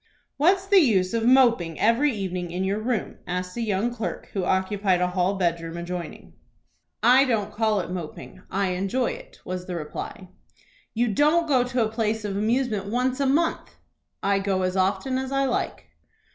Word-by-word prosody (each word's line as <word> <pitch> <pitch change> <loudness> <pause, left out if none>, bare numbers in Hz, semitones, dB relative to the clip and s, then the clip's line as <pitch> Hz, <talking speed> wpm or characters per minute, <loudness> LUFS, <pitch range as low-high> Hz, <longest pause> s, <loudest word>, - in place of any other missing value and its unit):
"What's 370 +6 +3
the 395 0 +6
use 200 - +2
of 230 -1 0
moping 235 -11 +4
every 235 +7 +3
evening 185 -5 -4
in 180 +2 -3
your 195 +2 0
room?" 225 -1 -2
asked 180 0 -3
a 240 - -3
young 220 +2 0
clerk 230 -2 -5
who 195 - -1
occupied 190 0 +1
a 180 0 +1
hall 185 +2 0
bedroom 170 -2 -1
adjoining. 175 0 -6 0.7
"I 255 +3 +7
don't 210 -5 -1
call 215 -2 +1
it - - -7
moping. 175 -4 -7
I 195 0 0
enjoy 195 - 0
it," - - -11
was 180 0 -5
the 180 - -4
reply. 170 +3 -6 0.7
"You 240 +2 +2
don't 310 - +3
go 260 -4 +3
to 245 -2 0
a 215 - -4
place 220 -1 -1
of 200 -1 -3
amusement 215 -1 0
once 250 +4 0
a 275 - +2
month." 325 +5 0 0.5
"I 200 0 +2
go 195 -1 0
as 185 0 -1
often 195 +8 0
as 265 0 -4
I 275 0 +1
like." 255 - -2
210 Hz, 180 wpm, -25 LUFS, 185-255 Hz, 0.7 s, I